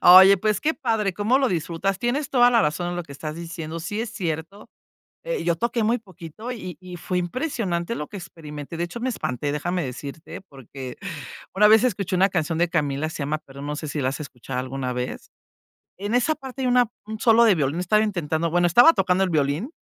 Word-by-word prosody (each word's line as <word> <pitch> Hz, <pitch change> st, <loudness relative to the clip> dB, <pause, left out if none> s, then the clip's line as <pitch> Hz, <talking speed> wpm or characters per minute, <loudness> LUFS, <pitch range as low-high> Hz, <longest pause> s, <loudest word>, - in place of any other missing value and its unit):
Oye, 190 Hz, +2 st, +9 dB
pues 215 Hz, 0 st, +1 dB
qué 315 Hz, -, +1 dB
padre, 225 Hz, -, 0 dB
cómo 210 Hz, +7 st, +2 dB
lo 265 Hz, -, +2 dB
disfrutas. 175 Hz, +2 st, -1 dB
Tienes 270 Hz, +5 st, -1 dB
toda 245 Hz, -2 st, +6 dB
la 230 Hz, -2 st, +4 dB
razón 175 Hz, +4 st, -1 dB
en 175 Hz, -, -4 dB
lo 175 Hz, -, -2 dB
que 150 Hz, -, -18 dB
estás 155 Hz, +2 st, -6 dB
diciendo. 165 Hz, -1 st, -6 dB
Sí 205 Hz, +6 st, -3 dB
es 225 Hz, -1 st, -3 dB
cierto, 180 Hz, -1 st, -5 dB, 0.6 s
eh, -, -, -2 dB
yo 170 Hz, -1 st, +2 dB
toqué 235 Hz, +3 st, 0 dB
muy 230 Hz, +3 st, +2 dB
poquito, 195 Hz, +3 st, -9 dB
y 185 Hz, -7 st, -7 dB
y 180 Hz, -1 st, -9 dB
fue 180 Hz, +2 st, -3 dB
impresionante 185 Hz, -, -2 dB
lo 150 Hz, -, -4 dB
que 200 Hz, -, -7 dB
experimenté. 150 Hz, -3 st, -8 dB
De 170 Hz, -, -1 dB
hecho, 205 Hz, +7 st, -7 dB
me 255 Hz, -, -1 dB
espanté, 145 Hz, -, -2 dB
déjame 175 Hz, +5 st, -1 dB
decirte, 140 Hz, +7 st, -7 dB
porque 135 Hz, -, -9 dB, 0.6 s
una 210 Hz, +2 st, +6 dB
vez 220 Hz, +1 st, +7 dB
escuché 200 Hz, -6 st, 0 dB
una 190 Hz, +2 st, +4 dB
canción 165 Hz, -3 st, -1 dB
de 175 Hz, 0 st, +3 dB
Camila, 150 Hz, -2 st, 0 dB
se 160 Hz, -, -7 dB
llama, 150 Hz, +2 st, -1 dB
pero 140 Hz, +1 st, -10 dB
no 150 Hz, +1 st, -3 dB
sé 155 Hz, -1 st, -5 dB
si 145 Hz, -, -3 dB
la 130 Hz, -, +1 dB
has 135 Hz, -, -6 dB
escuchado 125 Hz, -2 st, -5 dB
alguna 130 Hz, 0 st, -3 dB
vez. 125 Hz, 0 st, -5 dB, 0.7 s
En 205 Hz, +4 st, -3 dB
esa 280 Hz, +6 st, +3 dB
parte 265 Hz, -1 st, -7 dB
hay 255 Hz, -, +1 dB
una 245 Hz, -1 st, +4 dB, 0.2 s
un 220 Hz, +1 st, -7 dB
solo 230 Hz, 0 st, +6 dB
de 220 Hz, -4 st, +6 dB
violín 145 Hz, -1 st, 0 dB
estaba 210 Hz, +4 st, +3 dB
intentando 170 Hz, -5 st, -1 dB
bueno, 175 Hz, +1 st, +3 dB
estaba 245 Hz, -, +7 dB
tocando 185 Hz, 0 st, +2 dB
el 190 Hz, -, +2 dB
violín. 155 Hz, -, 0 dB
175 Hz, 220 wpm, -24 LUFS, 155-220 Hz, 0.7 s, Oye